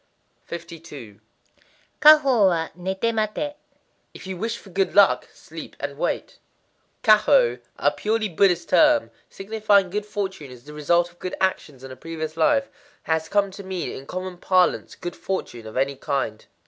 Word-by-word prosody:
52.—Kwahō 170 Hz, -, +1 dB
wa, 165 Hz, -3 st, 0 dB
nété 190 Hz, +5 st, -1 dB
maté. 220 Hz, +7 st, -2 dB, 0.6 s
If -, -, -11 dB
you 190 Hz, 0 st, -5 dB
wish 225 Hz, +5 st, -3 dB
for 195 Hz, -, -15 dB
good 195 Hz, +1 st, 0 dB
luck, 200 Hz, -1 st, +5 dB
sleep -, -, -11 dB
and -, -, -4 dB
wait. -, -, -3 dB, 0.6 s
Kwahō, 215 Hz, -, +5 dB, 0.2 s
a 145 Hz, -, +2 dB
purely 215 Hz, +9 st, -1 dB
Buddhist 175 Hz, -1 st, +2 dB
term, 300 Hz, -2 st, +4 dB, 0.2 s
signifying 205 Hz, -2 st, +1 dB
good 210 Hz, +1 st, -3 dB
fortune 190 Hz, -8 st, -4 dB
as 125 Hz, -1 st, -13 dB
the 150 Hz, +2 st, -11 dB
result 170 Hz, +4 st, +1 dB
of 175 Hz, -, -27 dB
good 185 Hz, -, -4 dB
actions 150 Hz, -8 st, -2 dB
in 135 Hz, -, -9 dB
a -, -, -8 dB
previous 160 Hz, +2 st, -6 dB
life, 275 Hz, -, +2 dB, 0.4 s
has 160 Hz, 0 st, -1 dB
come 200 Hz, -1 st, +1 dB
to 200 Hz, +2 st, -9 dB
mean 185 Hz, -2 st, -4 dB
in 135 Hz, -, -10 dB
common 185 Hz, -1 st, -6 dB
parlance 185 Hz, -1 st, +1 dB
good 175 Hz, -, -6 dB
fortune 120 Hz, -12 st, -5 dB
of 110 Hz, -, -8 dB
any 135 Hz, +1 st, +1 dB
kind. 120 Hz, -7 st, -3 dB
185 Hz, 155 wpm, -23 LUFS, 155-210 Hz, 0.6 s, luck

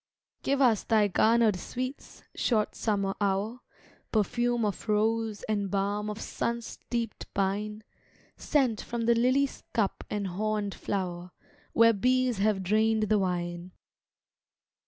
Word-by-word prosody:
Give 280 Hz, 0 st, +2 dB
us 230 Hz, -5 st, +3 dB
thy 215 Hz, -2 st, +3 dB
garnered 220 Hz, 0 st, +4 dB
sweets, 255 Hz, +8 st, -6 dB
short 215 Hz, -4 st, +1 dB
summer 200 Hz, -3 st, 0 dB
hour: 200 Hz, +4 st, 0 dB, 0.5 s
Perfume 240 Hz, +2 st, +1 dB
of 205 Hz, +1 st, -4 dB
rose, 220 Hz, 0 st, +1 dB
and 205 Hz, -2 st, -1 dB
balm 205 Hz, +2 st, -1 dB
of 210 Hz, +1 st, -5 dB
sun 235 Hz, +1 st, -2 dB
steeped 230 Hz, -1 st, -5 dB
pine; 210 Hz, +2 st, -1 dB, 0.5 s
Scent 260 Hz, -8 st, +1 dB
from 235 Hz, -1 st, -4 dB
the 235 Hz, +1 st, +4 dB
lily's 255 Hz, +4 st, +2 dB
cup 210 Hz, -4 st, 0 dB
and 205 Hz, -1 st, -2 dB
horned 205 Hz, +2 st, -2 dB
flower, 180 Hz, -3 st, -3 dB, 0.4 s
Where 230 Hz, 0 st, +6 dB
bees 250 Hz, +1 st, +1 dB
have 200 Hz, -1 st, +1 dB
drained 215 Hz, +2 st, +2 dB
the 215 Hz, -1 st, +4 dB
wine. 175 Hz, -1 st, -3 dB
215 Hz, 125 wpm, -29 LUFS, 200-235 Hz, 0.5 s, Where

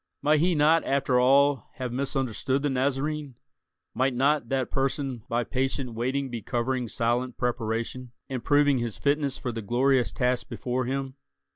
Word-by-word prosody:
Might 150 Hz, +1 st, +4 dB
he 175 Hz, +2 st, +2 dB
not 155 Hz, +2 st, +4 dB
after 135 Hz, -2 st, +1 dB
all 140 Hz, +2 st, +4 dB
have 125 Hz, -2 st, -4 dB
misunderstood 135 Hz, 0 st, -1 dB
the 145 Hz, -, +1 dB
Nazarene? 140 Hz, +1 st, -1 dB, 0.6 s
Might 130 Hz, +2 st, +1 dB
not 135 Hz, -1 st, +2 dB
that 135 Hz, -2 st, -1 dB
person 135 Hz, -2 st, -1 dB
by 120 Hz, +1 st, +1 dB
patient 130 Hz, 0 st, -2 dB
waiting 130 Hz, +3 st, -2 dB
be 120 Hz, -2 st, -4 dB
covering 125 Hz, +2 st, -1 dB
silent 120 Hz, +3 st, -1 dB
preparation, 120 Hz, +1 st, -2 dB, 0.2 s
and 130 Hz, -3 st, -4 dB
proving 145 Hz, -2 st, +3 dB
his 120 Hz, -3 st, -3 dB
fitness 140 Hz, -1 st, 0 dB
for 125 Hz, -, -3 dB
the 115 Hz, -1 st, -5 dB
glorious 125 Hz, +4 st, +2 dB
task 125 Hz, -1 st, 0 dB
before 125 Hz, 0 st, -2 dB
him? 135 Hz, +1 st, -3 dB
130 Hz, 155 wpm, -27 LUFS, 120-140 Hz, 0.6 s, Might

